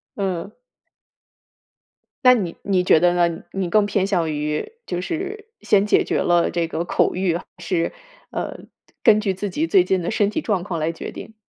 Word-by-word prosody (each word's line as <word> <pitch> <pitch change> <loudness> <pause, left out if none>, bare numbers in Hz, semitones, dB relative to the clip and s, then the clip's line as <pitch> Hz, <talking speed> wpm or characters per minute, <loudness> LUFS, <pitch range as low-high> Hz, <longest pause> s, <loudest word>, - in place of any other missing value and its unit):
嗯。 185 -4 -3 1.7
那 250 0 +8
你 185 -8 -2
你 190 -2 +1
觉 170 - +5
得 175 +1 +3
呢？ 170 -1 +1
你 190 -2 -2
更 210 +1 +4
偏 195 -1 +1
向 175 -5 0
于 150 - -2
就 175 - -2
是 380 - -4
先 205 0 +3
解 - - +4
决 - - -1
了 175 -1 +2
这 170 -1 0
个 165 +1 -3
口 - - +1
欲， 180 -2 0
还 - - -6
是， 170 -1 -1 0.4
呃， - - -4 0.4
根 215 -1 +6
据 200 -3 0
自 200 +2 -3
己 310 - -1
最 365 +1 +4
近 185 -2 0
的 170 - -2
身 210 -2 +2
体 315 - -2
状 205 - -1
况 175 -5 -3
来 155 +1 0
决 165 - -7
定？ 220 - -10
185 Hz, 205 characters per minute, -22 LUFS, 170-210 Hz, 1.7 s, 那